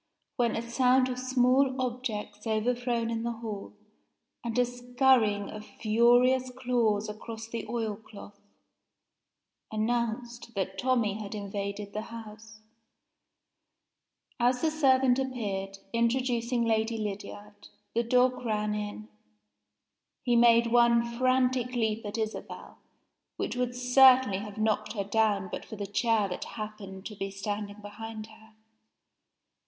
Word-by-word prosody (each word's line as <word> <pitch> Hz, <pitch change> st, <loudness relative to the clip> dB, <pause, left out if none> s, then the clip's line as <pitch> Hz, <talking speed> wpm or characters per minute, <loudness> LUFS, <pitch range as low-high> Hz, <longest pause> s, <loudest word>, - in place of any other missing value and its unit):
when 240 Hz, -4 st, +1 dB
a 230 Hz, -, -2 dB
sound 255 Hz, +1 st, +3 dB
of 250 Hz, 0 st, -3 dB
small 255 Hz, +1 st, +2 dB
objects 235 Hz, -4 st, -4 dB
overthrown 235 Hz, +1 st, 0 dB
in 225 Hz, -1 st, -2 dB
the 235 Hz, 0 st, -2 dB
hall, 220 Hz, -3 st, -6 dB, 0.7 s
and 235 Hz, -1 st, -3 dB
a 250 Hz, -, +5 dB
scurrying 245 Hz, -4 st, +2 dB
of 215 Hz, 0 st, -8 dB
furious 245 Hz, +4 st, +3 dB
claws 240 Hz, -5 st, 0 dB
across 220 Hz, +1 st, -7 dB
the 230 Hz, 0 st, -5 dB
oil 225 Hz, -3 st, -2 dB
cloth, 205 Hz, -1 st, -13 dB, 1.3 s
announced 235 Hz, +1 st, -2 dB
that 190 Hz, 0 st, -2 dB
Tommie 230 Hz, -5 st, +1 dB
had 210 Hz, +1 st, -6 dB
invaded 200 Hz, 0 st, -5 dB
the 215 Hz, -, -2 dB
house. 220 Hz, -1 st, -10 dB, 1.8 s
As 250 Hz, +3 st, +2 dB
the 320 Hz, -, +3 dB
servant 265 Hz, -4 st, +4 dB
appeared, 200 Hz, -7 st, -3 dB, 0.2 s
introducing 235 Hz, 0 st, +1 dB
Lady 225 Hz, 0 st, +1 dB
Lydiard, 205 Hz, 0 st, -7 dB, 0.3 s
the 235 Hz, -, +2 dB
dog 250 Hz, +2 st, +2 dB
ran 210 Hz, -2 st, 0 dB
in. 205 Hz, -, -5 dB, 1.2 s
He 240 Hz, -2 st, +2 dB
made 235 Hz, 0 st, +6 dB
one 235 Hz, -1 st, +5 dB
frantic 255 Hz, +1 st, +1 dB
leap 225 Hz, -1 st, 0 dB
at 205 Hz, -, -4 dB
Isabel, 220 Hz, -1 st, -5 dB, 0.6 s
which -, -, -2 dB
would 245 Hz, 0 st, -1 dB
certainly 250 Hz, -4 st, +6 dB
have 205 Hz, 0 st, -8 dB
knocked 215 Hz, -1 st, 0 dB
her 205 Hz, -3 st, -2 dB
down 205 Hz, -1 st, +1 dB
but -, -, -5 dB
for -, -, -9 dB
the 205 Hz, -1 st, -4 dB
chair 215 Hz, +1 st, +1 dB
that 180 Hz, -, -5 dB
happened 210 Hz, -3 st, -7 dB
to 215 Hz, -, -6 dB
be 195 Hz, 0 st, -4 dB
standing 205 Hz, +1 st, -5 dB
behind 215 Hz, +1 st, -7 dB
her. 220 Hz, 0 st, -18 dB
230 Hz, 125 wpm, -29 LUFS, 210-245 Hz, 1.8 s, made